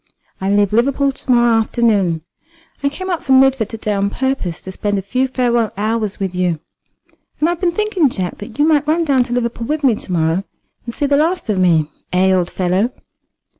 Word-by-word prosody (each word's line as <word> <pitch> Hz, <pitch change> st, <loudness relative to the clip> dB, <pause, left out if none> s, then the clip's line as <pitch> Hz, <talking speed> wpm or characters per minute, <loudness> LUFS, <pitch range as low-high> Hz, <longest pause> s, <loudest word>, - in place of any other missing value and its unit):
I 190 Hz, -, -1 dB
leave 205 Hz, 0 st, +2 dB
Liverpool 275 Hz, +4 st, +2 dB
to 265 Hz, -, -4 dB
morrow 240 Hz, -2 st, +4 dB
afternoon. 205 Hz, -8 st, +1 dB, 0.6 s
I 280 Hz, -, +1 dB
came 370 Hz, +6 st, -5 dB
up 345 Hz, -, -1 dB
from 265 Hz, -1 st, +4 dB
Lidford 265 Hz, -5 st, +3 dB
to 225 Hz, -, -6 dB
day 215 Hz, -1 st, -2 dB
on 200 Hz, 0 st, 0 dB
purpose 265 Hz, -9 st, -2 dB
to 190 Hz, -, -6 dB
spend 205 Hz, +2 st, -2 dB
a 195 Hz, -, -3 dB
few 255 Hz, +7 st, 0 dB
farewell 240 Hz, -3 st, 0 dB
hours 215 Hz, 0 st, -1 dB
with 190 Hz, -2 st, -2 dB
you. 180 Hz, -3 st, 0 dB, 0.8 s
And 305 Hz, -, +2 dB
I -, -, +2 dB
have 345 Hz, -, -5 dB
been 355 Hz, -2 st, +2 dB
thinking, 385 Hz, -6 st, +1 dB
Jack, 185 Hz, -6 st, -4 dB
that 210 Hz, +4 st, -9 dB
you 295 Hz, +1 st, +3 dB
might 300 Hz, -2 st, +2 dB
run 330 Hz, +2 st, +2 dB
down 275 Hz, -4 st, +3 dB
to 245 Hz, -, -5 dB
Liverpool 235 Hz, -1 st, -2 dB
with 305 Hz, 0 st, -2 dB
me 260 Hz, -4 st, +5 dB
to 205 Hz, -, -7 dB
morrow, 165 Hz, +2 st, +1 dB, 0.4 s
and 235 Hz, -, -5 dB
see 290 Hz, -, 0 dB
the 280 Hz, 0 st, +2 dB
last 330 Hz, -2 st, 0 dB
of 200 Hz, -3 st, +1 dB
me, 165 Hz, -4 st, +2 dB, 0.2 s
eh, 190 Hz, +1 st, +3 dB
old 180 Hz, -2 st, +1 dB
fellow?" 185 Hz, +6 st, 0 dB
230 Hz, 215 wpm, -18 LUFS, 190-275 Hz, 0.8 s, me